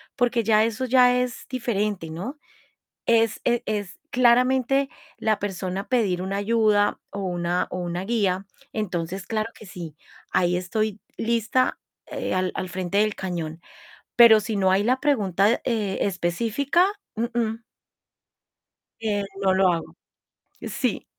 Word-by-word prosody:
Porque 245 -1 +1
ya 215 0 +4
eso 230 +3 -2
ya 250 0 +5
es 250 -1 -3
diferente, 210 -8 -2
¿no? 200 - -5 0.7
Es 230 -1 +3
e 240 -1 +2
es, 205 -3 -3
claramente, 255 +2 +3 0.3
la 215 -2 +1
persona 190 -1 -4
pedir 200 -8 +1
una 195 +1 -2
ayuda, 210 -1 +2
o 200 - -5
una 175 -1 -1
o - - -4
una 175 +1 -3
guía, 195 -4 0 0.3
entonces 185 -3 -3
claro 220 0 -2
que 215 - -13
sí, 170 -4 -8 0.4
ahí 175 0 +2
estoy 210 +3 -2 0.2
lista, 235 +2 +1 0.3
eh, - - -3
al 185 0 0
al 185 - -3
frente 185 +2 -1
del 215 0 +2
cañón. 170 -3 -4 0.6
Pero 230 -2 +8
si 215 +1 -3
no 190 -1 +3
hay 195 - +3
la 255 +3 +2
pregunta, 210 - +2
eh, 215 -5 -1
específica, 225 - +1 0.3
uh-uh. 230 -1 -1 1.4
Eh, 210 -2 -1 0.2
no 190 -1 +4
lo 190 -1 +4
hago. 165 -1 -4 0.6
Sí - - -2
210 Hz, 135 wpm, -24 LUFS, 185-235 Hz, 1.4 s, Pero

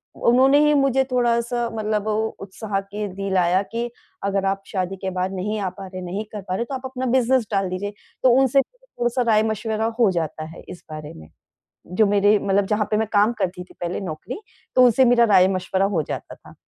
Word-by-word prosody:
उन्होंने 265 +4 +4
ही 300 - +4
मुझे 270 -2 +3
थोड़ा-सा 240 -1 +1
मतलब 215 -1 -1
ओ 215 - +1 0.2
उत्साह 195 +1 -4
के 205 +1 -5
दिलाया 190 -1 +1
कि 235 +1 -2 0.3
अगर 195 -1 0
आप 195 0 0
शादी 190 -1 -2
के 190 0 -4
बाद 185 +1 -2
नहीं 210 +3 -2
आ 195 - -1
पा 190 +1 -10
रहे, 185 0 -7
नहीं 185 +4 -4
कर 210 -2 -6
पा 185 - -1
रहे 235 - -1
तो 270 - -7
आप 260 0 -7
अपना 260 0 -4
बिज़नेस 250 -2 +2
डाल 195 -2 0
दीजिए। 205 +3 -4 0.3
तो 255 - +6
उनसे 270 +1 +4
थोड़ा-सा 265 - -4
राय-मशवरा 220 0 +1
हो 215 -5 +5
जाता 160 -2 -3
है - - -11
इस 175 - -10
बारे 155 -1 -7
में, 80 -1 -13 0.6
जो 195 +5 +2
मेरे 205 +1 +4
मतलब 200 0 +1
जहाँ 210 0 0
पे 215 - +2
मैं 220 +1 +1
काम 210 +2 +4
करती 180 0 -2
थी - - -19
पहले 175 0 -3
नौकरी 190 - -6 0.3
तो 255 - +7
उनसे 250 +2 +5
मेरा 240 -1 +5
राय-मशवरा 185 +1 +3
हो 160 - +2
जाता - - -5
था। - - -17
205 Hz, 205 wpm, -22 LUFS, 190-235 Hz, 0.6 s, तो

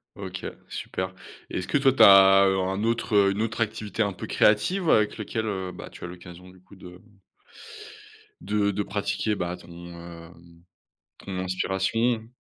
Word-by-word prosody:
OK, - - -7 0.2
super. 95 0 -5 0.3
Est-ce 90 - -4
que - - +1
toi, 135 -1 +4
tu 135 - +5
as, 95 0 +8
heu, 95 0 +1
un 95 +2 -2
autre, 115 -1 -1
heu 100 -1 +5
une 100 +2 -2
autre 110 0 -2
activité 110 -1 -1
un 100 -1 -2
peu - - -8
créative 165 - +2
avec 105 -1 +2
lequel, 110 +1 -3
heu, 95 -3 -3
bah, - - -10
tu - - -13
as - - -4
l'occasion, 90 0 -12
du 90 0 -18
coup, 95 +2 -18
de 90 -1 -13 1.4
de 105 -1 0
de 105 +1 -2
pratiquer, 105 +2 -2
bah, 90 -2 -3
ton, 90 - -16 0.2
hem, 85 0 -13 0.6
ton 95 -2 -6
inspiration? 95 +5 -1
95 Hz, 170 wpm, -25 LUFS, 90-110 Hz, 1.4 s, as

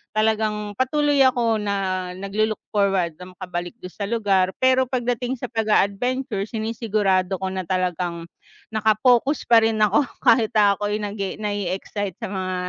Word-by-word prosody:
talagang 215 -1 0
patuloy 290 +2 +2
ako 235 -4 +1
na 195 -3 -2
naglo-look 210 +3 -1
forward 195 -5 +1
na 180 0 -11
makabalik 175 -2 -5
dun 180 - -7
sa 200 -1 -5
lugar 200 -5 +2 0.2
pero 260 0 +4
pagdating 245 0 -2
sa 250 -2 -6
pag-a-adventure 220 0 0
sinisigurado 210 -4 0
ko 190 - -2
na 190 0 -3
talagang 180 -2 -2 0.5
naka-focus 220 +6 +2
pa 230 -1 +7
rin 225 0 +2
ako 215 +6 +3 0.2
kahit 225 -3 +4
ako'y 205 0 +2
nag-e 200 -2 -4
na-e-excite 205 -1 -3
sa 195 - -5
mga 185 -1 -3
210 Hz, 135 wpm, -22 LUFS, 190-230 Hz, 0.5 s, pa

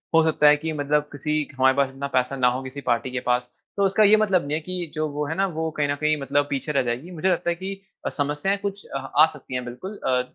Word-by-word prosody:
हो 165 - +6
सकता 155 -2 +3
है 150 0 +7
कि 160 +2 -3
मतलब 150 0 +1
किसी 150 +2 -1
क 140 - -17
हमारे 130 0 +5
पास 140 -1 +3
इतना 135 +1 -4
पैसा 130 +1 +1
ना 125 -2 +3
हो, 125 +1 0
किसी 130 +2 -7
पार्टी 120 0 0
के 125 - -2
पास, 125 0 0 0.3
तो 200 - +2
उसका 195 +3 +3
ये 210 +1 +7
मतलब 195 -7 +2
नहीं 145 - -2
है 155 - +1
कि 175 -1 -5
जो 155 0 0
वो 150 +1 -3
है 160 - -3
ना, 195 - +2
वो 160 -2 -2
कहीं 145 -1 +2
न 145 - +1
कहीं 150 +1 +1
मतलब 140 +1 +1
पीछे 140 +2 -2
रह 140 - +2
जाएगी। 125 +8 -3
मुझे 175 +2 0
लगता 175 -1 +1
है 170 - +1
कि 190 +3 -5 0.3
अ, - - +1
समस्याएँ 150 +5 -1
कुछ 200 0 -5
अ, - - -5
आ 140 +3 +4
सकती 140 -3 -11
हैं, 125 -1 -2
बिल्कुल। 185 - -7
अ, 125 -1 +3
150 Hz, 285 wpm, -24 LUFS, 135-170 Hz, 0.3 s, है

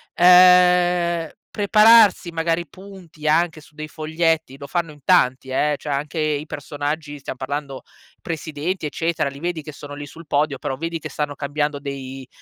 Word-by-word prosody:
Ehm, 180 -2 +5 0.3
prepararsi 215 -3 +5
magari 165 +1 -1
punti 185 -4 -11
anche 165 0 +1
su 150 0 -21
dei 155 0 -6
foglietti 160 -2 -1
lo 140 0 -9
fanno 170 +1 -2
in 150 - -16
tanti, 130 -7 +2
eh, 150 +3 +1
cioè 145 0 -4
anche 150 +3 -3
i 155 -1 -1
personaggi 145 0 -5
stiamo 130 -1 -7
parlando 140 0 -5 0.4
presidenti, 160 +2 -4
eccetera, 160 0 -1
li 140 0 -11
vedi 170 0 -3
che 155 - -8
sono 145 0 -10
lì 145 0 -7
sul 160 +3 -13
podio, 145 0 0
però 135 - -4
vedi 165 +2 -4
che - - -6
stanno 150 -1 -3
cambiando 145 +1 -2
dei 135 -2 -7
155 Hz, 165 wpm, -21 LUFS, 145-170 Hz, 0.4 s, Ehm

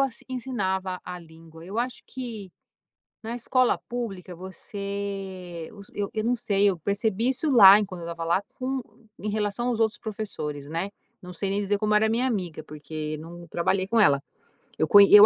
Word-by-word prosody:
as 270 -3 0
ensinava 190 -8 -2
a 180 - -6
língua, 165 0 -14
eu 200 +5 -4
acho 245 +1 -2
que, 230 -7 -6 0.7
na 230 +2 -3
escola 250 +1 +2
pública 195 -7 -5
você, 190 -2 -5
os 200 -1 -12
eu 205 -1 -2
eu 215 -1 -1
não 245 +2 +2
sei, 205 -3 +3
eu 185 - -1
percebi 205 - +1
isso 270 +4 0
lá 205 -5 +10
enquanto 190 -4 -4
eu 170 - -5
estava 165 0 -5
lá 170 +3 +2 0.2
com 265 0 -1 0.4
em 210 - -3
relação 210 +3 -1
aos 235 -2 -1
outros 225 +1 +2
professores, 200 -11 -5
né, 165 +5 -2 0.3
não 180 0 -9
sei 195 +3 -2
nem 200 +1 0
dizer 205 0 +1
como 210 0 +1
era 220 +1 +5
a - - 0
minha 245 +3 +2
amiga, 180 -9 -2
porque 155 +1 -5
não 170 +2 -10
trabalhei 185 +3 0
com 230 +2 +2
ela. 140 -9 +5 0.6
Eu 155 - +2
con 205 - +9
eu 205 +1 +10
200 Hz, 190 wpm, -26 LUFS, 175-220 Hz, 0.7 s, lá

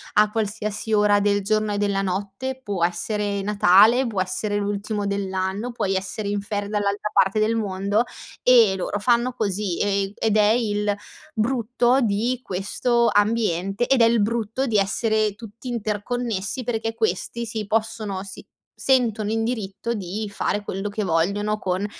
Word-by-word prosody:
a 210 0 +5
qualsiasi 215 0 -3
ora 205 -1 +4
del 205 0 +2
giorno 215 +1 +1
e - - -1
della 200 -1 +1
notte. 200 +8 -3
Può 200 -6 -2
essere 205 +2 -2
Natale, 210 +5 +5
può 205 -5 -1
essere 205 +3 -2
l'ultimo 205 +1 -2
dell'anno, 195 +3 -2
puoi 205 -5 -1
essere 195 +2 -3
in 205 0 -1
ferie 205 0 -3
dall'altra 205 0 -1
parte 195 +2 +3
del 215 +2 +2
mondo, 200 0 0 0.4
e 230 -6 +6
loro 200 +2 -2
fanno 240 +3 +2
così, 200 -4 -2
e, 200 -1 +1
ehm, 195 - -10
ed 220 -2 +1
è 210 0 +5
il 210 -3 +1 0.4
brutto 245 +2 +1
di 230 +3 0
questo 235 +5 +1
ambiente, 205 -1 +1
ed 270 -2 +3
è - - +7
il 230 -1 +3
brutto 225 +4 -1
di 220 -3 +2
essere 215 +1 +1
tutti 225 +3 -10
interconnessi, 225 0 -2
perché 225 -1 -2
questi 230 +2 -1
si 220 -1 -4
possono 215 -3 -2
si 195 -2 -10 0.3
sentono 230 -5 +2
in 225 0 0
diritto 225 -1 -3
di 205 +1 -4
fare 205 0 -1
quello 195 0 -4
che 210 +1 -3
vogliono 200 +5 0
con 185 +1 -1
210 Hz, 160 wpm, -23 LUFS, 200-225 Hz, 0.4 s, è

